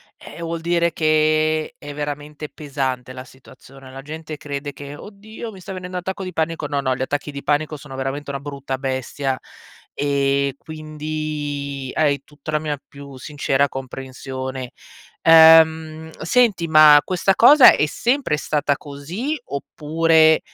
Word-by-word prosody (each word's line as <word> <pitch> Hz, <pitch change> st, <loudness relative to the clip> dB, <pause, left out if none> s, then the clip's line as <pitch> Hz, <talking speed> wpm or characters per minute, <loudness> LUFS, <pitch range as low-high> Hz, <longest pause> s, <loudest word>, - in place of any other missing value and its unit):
eh, -, -, -12 dB
vuol 165 Hz, 0 st, -4 dB
dire 170 Hz, 0 st, +1 dB
che 155 Hz, 0 st, +1 dB
è 145 Hz, -1 st, -9 dB
veramente 150 Hz, +1 st, -5 dB
pesante 135 Hz, -4 st, -4 dB
la 130 Hz, 0 st, -9 dB
situazione. 130 Hz, 0 st, -16 dB
La 135 Hz, +1 st, -9 dB
gente 155 Hz, 0 st, -7 dB
crede 145 Hz, 0 st, -5 dB
che: 145 Hz, 0 st, -9 dB
"Oddio, 215 Hz, +5 st, -10 dB
mi 195 Hz, -, -12 dB
sta 190 Hz, -, -8 dB
venendo 180 Hz, 0 st, -6 dB
un -, -, -3 dB
attacco 190 Hz, +2 st, -5 dB
di 185 Hz, -, -5 dB
panico." 160 Hz, -2 st, -2 dB
No, 145 Hz, 0 st, -1 dB
no, 130 Hz, -2 st, 0 dB
gli 130 Hz, -, -7 dB
attacchi 145 Hz, +3 st, -2 dB
di 140 Hz, 0 st, -8 dB
panico 150 Hz, +1 st, 0 dB
sono 140 Hz, -2 st, -10 dB
veramente 135 Hz, +2 st, -4 dB
una 140 Hz, 0 st, -3 dB
brutta 140 Hz, -1 st, -5 dB
bestia, 130 Hz, 0 st, -3 dB, 0.6 s
ehm, 140 Hz, -1 st, +1 dB
quindi 150 Hz, -3 st, -5 dB
hai 145 Hz, -3 st, +1 dB
tutta 150 Hz, +1 st, -9 dB
la 150 Hz, -, +1 dB
mia 150 Hz, -2 st, -3 dB
più 140 Hz, -1 st, -12 dB
sincera 140 Hz, +1 st, 0 dB
comprensione. 130 Hz, -1 st, -7 dB, 0.5 s
Ehm, 160 Hz, -1 st, +6 dB
senti, 195 Hz, -2 st, +2 dB
ma 155 Hz, -1 st, +8 dB
questa 190 Hz, +1 st, +1 dB
cosa 270 Hz, +5 st, +8 dB
è -, -, +2 dB
sempre 240 Hz, -, 0 dB
stata 145 Hz, -2 st, 0 dB
così, 170 Hz, -, -5 dB
oppure 160 Hz, +2 st, +2 dB
150 Hz, 150 wpm, -21 LUFS, 140-160 Hz, 0.6 s, ma